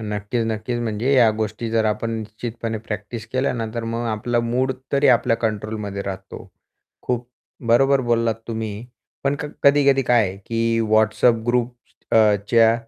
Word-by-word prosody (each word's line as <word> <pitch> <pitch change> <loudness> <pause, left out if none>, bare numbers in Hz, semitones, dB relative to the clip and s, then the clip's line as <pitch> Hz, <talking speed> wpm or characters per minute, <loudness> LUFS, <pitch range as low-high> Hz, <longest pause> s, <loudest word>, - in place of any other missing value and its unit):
नक्कीच, 105 +2 -2
नक्कीच, 110 +2 -2
म्हणजे 115 +3 -1
या 120 -4 +6
गोष्टी 110 +1 -3
जर 115 -1 +2
आपण 110 +2 -1
निश्चितपणे 110 +1 -5
प्रॅक्टिस 105 +1 -5
केल्या 130 +2 +1
ना, 115 -3 -3
तर 115 -1 -3
मग 115 +1 -3
आपला 120 +2 0
मूड 125 +3 0 0.2
तरी 140 0 +3
आपल्या 120 -2 +4
कंट्रोलमध्ये 105 -2 -3
राहतो. 95 0 -7 0.5
खूप 125 -1 -2 0.4
बरोबर 135 +4 +4
बोललात 115 -2 +1
तुम्ही, 110 -1 -4 0.4
पण 140 +1 +2
क - - -4 0.2
कधी-कधी 140 -1 +5
काय 115 -6 +2
की 115 0 0
WhatsApp 110 +1 +3
ग्रुपच्या 115 -2 +2
115 Hz, 140 wpm, -22 LUFS, 110-120 Hz, 0.5 s, या